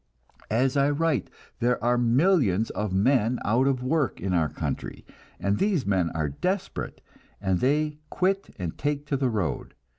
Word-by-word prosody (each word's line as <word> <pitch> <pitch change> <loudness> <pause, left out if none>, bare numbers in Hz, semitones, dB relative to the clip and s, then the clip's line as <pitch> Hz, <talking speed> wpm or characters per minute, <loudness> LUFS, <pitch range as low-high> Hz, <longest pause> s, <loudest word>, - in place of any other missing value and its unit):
As 125 +5 +2
I 140 0 +3
write, 150 -1 0 0.3
there 125 0 +2
are 120 +1 +3
millions 120 - +3
of 105 -2 -3
men 120 +4 +2
out 120 +6 +3
of 130 -2 0
work 140 -1 0
in 95 0 -2
our 80 -4 +2
country, - - -5 0.3
and 100 +1 0
these 195 - +1
men 95 -4 +1
are 75 -2 0
desperate, 180 - -3 0.4
and 95 -3 0
they 150 +3 +1
quit 195 +2 0
and 85 -3 -4
take 145 0 -1
to 145 - -1
the 135 -2 +1
road. 100 - -2
125 Hz, 160 wpm, -26 LUFS, 100-145 Hz, 0.4 s, I